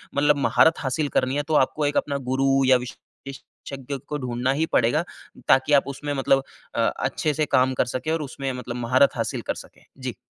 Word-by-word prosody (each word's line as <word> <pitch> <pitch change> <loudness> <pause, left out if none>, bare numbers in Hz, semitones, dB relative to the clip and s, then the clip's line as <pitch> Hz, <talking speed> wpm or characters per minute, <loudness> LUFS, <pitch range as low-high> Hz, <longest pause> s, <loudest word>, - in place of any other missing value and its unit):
मतलब 145 0 +3
महारत 160 +3 +4
हासिल 145 +2 -1
करनी 130 +1 +1
है 145 - 0
तो 160 - -2
आपको 150 +2 +2
एक 145 - 0
अपना 140 -1 0
गुरु 135 0 +2
या 130 -1 +6
विशेषज्ञ 135 +2 -9
को 150 - -3
ढूँढना 125 -1 -1
ही 155 +4 0
पड़ेगा, 125 +8 +3 0.4
ताकि 130 +3 +4
आप 140 -1 +4
उसमें 145 +1 -4
मतलब 135 0 +2 0.3
अ, - - -1
अच्छे 155 - -1
से 155 +1 0
काम 130 +1 +3
कर - - +1
सके 155 +5 -2
और 165 0 0
उसमें 135 -1 -4
मतलब 125 -1 -6
महारत 125 +4 +2
हासिल 115 - -3
कर - - -1
सकें। - - -13 0.2
जी। - - -5
135 Hz, 200 wpm, -24 LUFS, 130-145 Hz, 0.4 s, या